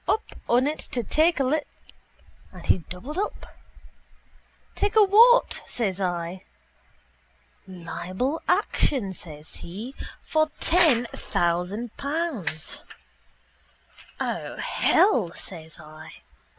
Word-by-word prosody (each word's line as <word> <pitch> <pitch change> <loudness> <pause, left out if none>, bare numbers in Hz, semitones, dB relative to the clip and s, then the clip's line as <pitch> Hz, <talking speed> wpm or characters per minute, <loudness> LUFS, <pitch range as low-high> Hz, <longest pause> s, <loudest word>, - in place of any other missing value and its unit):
p: - - +4
up 440 - -2 0.3
on 245 +2 +4
it 300 +2 -1
to 240 - -3
take 315 - +3
a - - +3
li... 295 +4 +1 0.9
And - - -12
he - - +3
doubled 225 - -7
up. 415 - -3 1.3
—Take 410 +1 -1
a 435 - +8
what? 465 +5 +6
says 200 -5 -2
I. 175 0 -3 1.2
—Libel 185 - -4
action, 215 -10 +2
says 155 -3 -9
he, 215 +9 -8 0.3
for 310 0 +1
ten 315 -9 +5
thousand 180 +7 -1
pounds. 280 - -3 1.4
—O - - -3
hell! 225 - +2
says 160 0 -9
I. 155 0 -12
235 Hz, 105 wpm, -25 LUFS, -, 1.4 s, a